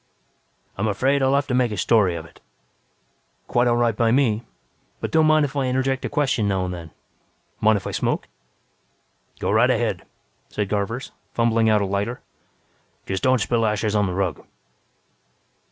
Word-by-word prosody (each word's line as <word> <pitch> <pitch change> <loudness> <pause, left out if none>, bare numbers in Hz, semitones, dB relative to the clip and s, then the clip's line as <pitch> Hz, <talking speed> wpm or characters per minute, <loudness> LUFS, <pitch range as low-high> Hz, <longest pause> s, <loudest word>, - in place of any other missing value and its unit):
"I'm 110 - +1
afraid 130 +7 +1
I'll 135 +1 +3
have 140 0 +1
to 130 - -3
make 125 -2 +2
a 105 - -4
story 95 -2 +3
of 80 -1 -6
it." 80 - -18 1.1
"Quite 120 0 +2
all 120 - +3
right 120 -2 +2
by 115 +1 +2
me, 115 -3 +2 0.6
but - - -4
don't 160 -1 +4
mind 155 -1 +4
if 145 0 -7
I 140 -2 0
interject 130 +1 0
a - - -2
question 140 -8 0
now 95 -2 0
and 90 - -4
then. 85 -2 -8 0.7
Mind 110 -1 +4
if 95 - -8
I - - -3
smoke?" - - -1 1.1
"Go - - -2
right - - +4
ahead," - - 0 0.5
said 105 -2 -3
Garvers, 110 +5 -2 0.2
fumbling 115 -1 +2
out 105 -2 +3
a - - 0
lighter. 100 +5 -2 0.9
"Just 95 -1 -3
don't 130 -2 +3
spill 115 0 +1
ashes 105 0 0
on 105 -1 +2
the 90 - -3
rug. 95 -6 -2
115 Hz, 175 wpm, -23 LUFS, 100-130 Hz, 1.1 s, don't